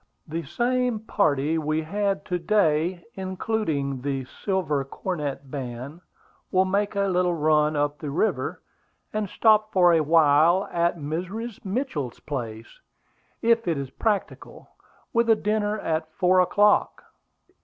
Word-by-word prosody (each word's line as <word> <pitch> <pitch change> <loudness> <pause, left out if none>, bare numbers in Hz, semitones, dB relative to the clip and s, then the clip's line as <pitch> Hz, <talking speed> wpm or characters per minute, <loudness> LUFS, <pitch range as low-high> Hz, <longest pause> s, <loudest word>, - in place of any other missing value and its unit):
"The 165 +2 -3
same 245 +2 -1
party 155 -7 +1
we 155 +1 -1
had 200 0 -1
to 180 -1 -2
day, 170 -1 +1
including 185 - -2
the 135 -1 -2
Silver 155 - -2
Cornet 140 -2 -5
Band, 130 +3 -6 0.5
will 185 0 +3
make 200 +2 0
a 200 - +1
little 180 -2 +1
run 155 -1 +2
up 145 0 -1
the 150 - -5
river, 160 +10 -1 0.5
and 210 -2 -2
stop 215 0 +3
for 180 -2 +5
a 165 - +4
while 160 +3 +4
at 170 0 +1
Mrs. 185 +9 -5
Mitchell's 190 - -3
place, 115 -6 -6 0.6
if 230 -2 +3
it 165 -3 +1
is 135 -1 -5
practicable, 210 -3 -3 0.4
with 235 -1 +2
a 225 - +7
dinner 210 0 -1
at 160 -4 -2
four 185 +1 +3
o'clock." 205 +3 +3
170 Hz, 135 wpm, -25 LUFS, 150-205 Hz, 0.6 s, a